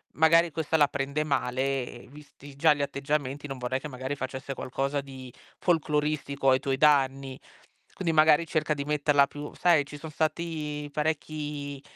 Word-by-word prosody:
magari 165 +1 +5
questa 160 0 -2
la 145 -2 +5
prende 140 +2 -2
male, 130 -3 -2
visti 145 -1 -14
già 155 0 +5
gli 145 - -4
atteggiamenti 140 0 -2
non 135 -2 -6
vorrei 125 +1 -2
che 150 - -7
magari 130 +1 -5
facesse 130 +1 -5
qualcosa 135 +3 -2
di 130 -2 -11 0.3
folcloristico 150 -4 0
ai 130 0 +4
tuoi 135 0 -1
danni. 135 -2 +2 0.5
Quindi 170 -4 -1
magari 155 +1 +5
cerca 155 -1 0
di 140 - -4
metterla 145 -1 +3
più: 145 +1 -8
"Sai, 165 -5 +3
ci 145 +1 -9
son 155 +1 -9
stati 155 -2 -2
parecchi, 150 -2 -3
145 Hz, 155 wpm, -27 LUFS, 135-155 Hz, 0.5 s, magari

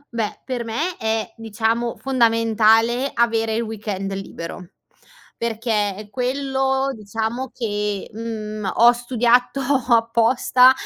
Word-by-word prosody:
Beh, 220 -3 -3
per 250 -2 -3
me 305 +11 -2
è 220 0 -2
diciamo 225 +2 -1
fondamentale 230 0 +3
avere 225 -1 +1
il 230 - 0
weekend 205 -3 -4
libero; 180 -2 -7 0.7
perché 215 -3 -1
quello 265 +1 0
diciamo 225 +4 -4
che, 210 -3 -2
mhmm, 215 -3 -4
ho 235 +1 +7
studiato 245 +1 +1 0.3
apposta 235 +2 +5
230 Hz, 100 wpm, -21 LUFS, 215-245 Hz, 0.7 s, ho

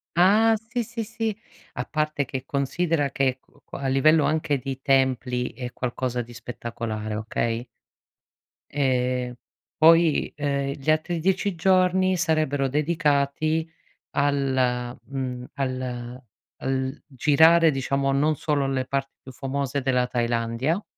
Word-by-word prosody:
Ah, 215 +6 +5
sì, 235 +3 -4
sì, 230 0 -5
sì, 220 -1 -3 0.4
A 125 - -4
parte 155 -2 -1
che 130 -1 -5
considera 145 +1 0
che 135 -2 +1
qu - - -28
qua - - -9
a 135 - -1
livello 150 +3 +4
anche 155 -2 +1
di 135 0 -6
templi 130 -3 +1
è 125 +1 -6
qualcosa 125 0 -2
di 120 0 -10
spettacolare, 115 -2 -5
okay? 115 +2 -2 1.1
Ehm, 125 -3 0 0.4
poi, 165 0 +5
ehm, 140 -1 -1
gli 150 +1 0
altri 160 +2 0
10 190 +2 0
giorni 185 +1 +3
sarebbero 155 -5 +1
dedicati 150 +1 +1 0.4
al 130 -4 0
mhmm, 130 -2 -5
al 130 -2 -4 0.4
al 130 +1 -2
girare 160 +4 +5
diciamo 135 0 0
non 150 +3 +2
solo 145 -2 0
le 130 -1 -1
parti 135 0 -3
più 130 - -10
famose 140 +1 -3
della 125 -1 +2
Thailandia 120 - -1
140 Hz, 125 wpm, -25 LUFS, 125-155 Hz, 1.1 s, Ah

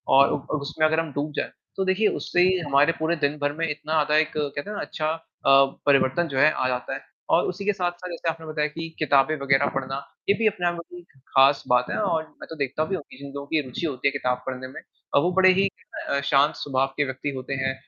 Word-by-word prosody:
और 140 +1 +6
उ - - +1
अ, - - -8
उसमें 155 +2 0
अगर 160 +1 +1
हम 165 -2 -3
डूब 145 +2 -2
जाएँ, - - -2 0.3
तो 190 - 0
देखिए 190 +3 +2
उससे 175 - +2 0.2
हमारे 145 +2 +4
पूरे 160 +2 +1
दिन 145 +2 -1
भर 145 0 +1
में 165 0 0
इतना 150 +1 -4
आधा 150 -1 +2
एक 155 0 +2
कहते 145 +2 -3
हैं 210 - -5
ना - - -3
अच्छा 155 - -3 0.4
अ, 135 0 +7 0.2
परिवर्तन 140 +3 +3
जो 135 -3 -5
है 155 - +7
आ 130 - -1
जाता 125 -1 -2
है - - -5 0.3
और - - +4
उसी 190 +2 -5
के 210 - +2
साथ-साथ 180 -1 -3
जैसे 170 -1 -3
आपने 165 0 -5
बताया 155 -1 0
कि 165 +2 -6
किताबें 145 0 +3
वग़ैरह 135 0 +3
पढ़ना, 135 0 -2 0.3
ये - - +7
भी 225 - +2
अपने 180 -4 0
आप 175 - +1
में 170 - -7
बहुत 180 - -9
ही - - -15 0.3
ख़ास 135 +1 +5
बात 125 0 +4
है - - -1
और 160 -1 +1
मैं - - -13
तो 160 - -7
देखता 140 +2 -1
भी 190 - -2
हूँ 170 - -6
कि - - -13
जिन 140 +1 -9
लोगों 140 0 -6
की 155 +1 +1
रुचि 130 +6 -4
होती 140 -4 -1
है - - +3
किताब 125 -3 -1
पढ़ने 130 0 -5
में, 130 - -10 0.3
वो 170 +6 +4
बड़े 185 0 +6
ही 195 +1 +3 0.4
अ, 140 - +1
शांत 140 +1 +3
स्वभाव 135 -1 0
के 145 - +3
व्यक्ति 130 +2 -4
होते 130 +1 -5
हैं 135 0 0
150 Hz, 260 wpm, -24 LUFS, 135-165 Hz, 0.4 s, अ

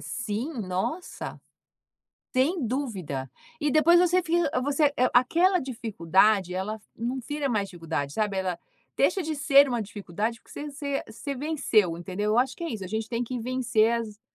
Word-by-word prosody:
Sim, 245 +4 -3
nossa, 190 - -4 0.9
sem 280 +4 +1
dúvida. 190 - -3 0.3
E 295 0 +1
depois 335 +3 +6
você 360 +1 +4
fica 335 -2 +1
você, 285 +1 +2
eh, 255 +1 +3
aquela 340 +10 +4
dificuldade 205 - +1
ela 210 +3 -3 0.2
não 245 +3 -2
vira 290 +2 -3
mais 205 -4 0
dificuldade, 165 -5 -4
sabe, 210 0 -1
ela 185 -2 -2 0.4
deixa 380 - +2
de 315 -1 -2
ser 280 -1 +5
uma 240 -2 -1
dificuldade 210 +2 -4
porque - - -18
você 295 0 -6
você 280 -1 -3
você 275 +6 -5
venceu, 250 - +1
entendeu. 190 +4 -3
Eu 230 - +3
acho 260 +2 +1
que - - -9
é 335 - -2
isso, 200 -4 -5
a - - -5
gente 220 +3 -3
tem 240 0 -1
que 250 +1 -4
vencer 235 -2 +2
as 220 -2 -3
240 Hz, 170 wpm, -27 LUFS, 205-285 Hz, 0.9 s, depois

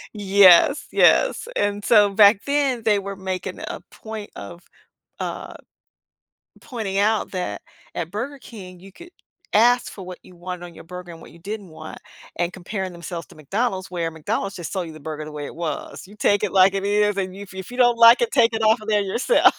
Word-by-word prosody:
Yes, 200 - +5
yes, - - +3
and 205 0 -1
so, 205 -3 +4
back 200 0 +6
then, 275 -5 0
they 210 -2 +3
were 200 0 -6
making 185 0 -5
a - - -6
point 220 -2 -8
of, 135 - -9 0.6
uh, - - -5 1.0
pointing 215 -6 -5
out 215 +2 +1
that 180 -2 -4 0.3
at 170 0 -4
Burger 265 +7 -5
King, 185 -7 -12
you 195 0 -14
could 345 - -14 0.4
ask 240 +3 +4
for 190 -3 -10
what 180 -1 -9
you 180 - -17
want 180 0 -7
on 175 - -12
your - - -13
burger 180 +1 -9
and 165 - -13
what - - -14
you 170 - -17
didn't 205 0 -7
want 155 0 -10 0.4
and 175 0 -1
comparing 190 0 -5
themselves 170 -1 -7
to - - -17
McDonald's, 190 - -2
where 170 -2 -3
McDonald's 175 +5 -3
just 175 +2 -6
sell 185 -2 -1
you 165 - -8
the 155 - -12
burger 155 +1 -6
the 155 - -9
way 145 -1 -6
it - - -9
was, 165 0 -5
you 205 - -15
take 205 0 +2
it 205 - -1
like 190 0 +5
it 195 0 -2
is, 205 0 +2
and 190 -2 -2
y 195 - -11
if 195 -1 -11
if 190 +4 -8
you 245 - -8
don't 240 -2 +4
like 230 - +8
it, 470 - +1
take 230 -3 +4
it 225 - -2
off 220 +1 +3
of 215 - -7
there 210 -1 +3
yourself. 235 - +3
195 Hz, 215 wpm, -22 LUFS, 180-220 Hz, 1.0 s, like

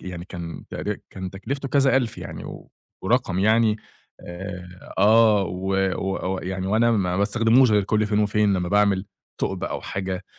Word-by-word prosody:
يعني 90 -2 -7
كان 85 -3 -8
تقري - - -4
كان 95 -1 -6
تكلِفته 135 +9 -5
كذا 135 0 +3
ألْف 125 -4 -1
يعني - - -7
و - - -10 0.3
ورقم 105 -3 +1
يعني 110 +2 +3 0.4
آآ، 90 0 -9
آه 110 0 +5
و 95 +2 -3 0.2
و 95 0 -2
ويعني 95 0 -4
وأنا 110 +4 +3
ما 95 -5 +1
باستخدموش 115 +5 +4
غير 105 -1 +4
كل 110 +2 +1
فين 105 0 0
وفين 105 -1 +2
لمّا 90 -2 -1
باعمل 100 -1 +2 0.3
ثُقب - - -2
أو - - -4
حاجة، 95 -1 -4
100 Hz, 160 wpm, -23 LUFS, 95-110 Hz, 0.4 s, آه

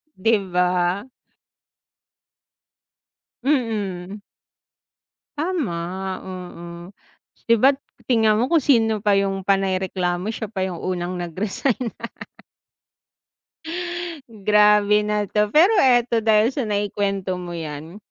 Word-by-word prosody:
'di 225 +4 +3 0.2
ba. 180 +1 +1 2.4
Mm. 210 -8 -1 1.2
Tama, 300 - -1 0.5
oo, 180 -2 -8 0.8
'di 230 - +5
ba't 270 +1 +6 0.3
tingnan 220 -4 +4
mo 250 - 0
kung 330 -3 +4
sino 225 -5 +3
pa 205 - +4
yung 195 -1 0
panay 195 -1 +2
reklamo 185 -1 -2
siya 220 - -5
pa 205 -4 -4
yung 180 -3 -6
unang 180 -1 -2
nag-resign. 210 - -2 2.4
Grabe 210 -1 +4
na 210 0 -1
'to, 210 +1 0
pero 340 - +5
eto 240 -3 +3
dahil 220 +2 +3
sa 275 - -2
naikwento 200 -2 -1
mo 175 - -7
'yan, 160 +1 -7
205 Hz, 100 wpm, -22 LUFS, 185-225 Hz, 2.4 s, ba't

